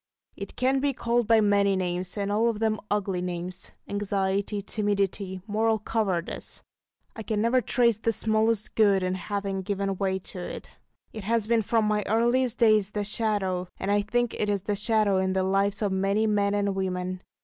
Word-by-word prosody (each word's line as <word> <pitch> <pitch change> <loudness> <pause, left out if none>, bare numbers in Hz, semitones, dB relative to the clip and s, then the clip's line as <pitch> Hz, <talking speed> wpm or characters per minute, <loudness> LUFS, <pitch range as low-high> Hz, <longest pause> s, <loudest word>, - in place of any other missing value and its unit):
It - - -8
can 260 +2 +2
be 280 0 +1
called 235 -2 0
by 225 -1 +5
many 200 -1 +3
names, 180 +1 -3
and 200 0 -1
all 220 +3 +2
of 225 - -2
them 215 -1 0
ugly 195 -3 -1
names 180 +1 -5 0.2
anxiety, 200 0 -1
timidity, 200 -2 -2
moral 220 +1 +1
cowardice. 205 -5 -3 0.5
I 225 - -6
can 215 0 -2
never 235 +4 +3
trace 235 -1 +2
the 230 - +1
smallest 220 -1 0
good 200 -3 +3
in 185 0 0
having 195 +1 -3
given 195 0 -2
way 190 -1 0 0.2
to 185 - -6
it. 175 - -7 0.4
It 215 -3 -7
has 230 0 +1
been 230 0 +2
from 220 +1 +1
my 210 0 +1
earliest 240 +2 +2
days 215 -4 +4
the 210 - -1
Shadow; 200 -4 -1
and 195 - -2
I 205 0 +3
think 240 +3 0
it 210 - -1
is 200 -2 -1
the 205 0 -1
shadow 215 -2 +2
in 190 0 +1
the 190 0 +1
lives 195 +2 +1
of 205 - +1
many 195 +3 +1
men 205 -1 +1
and 200 -1 0
women. 185 -1 -3
205 Hz, 185 wpm, -26 LUFS, 190-220 Hz, 0.5 s, by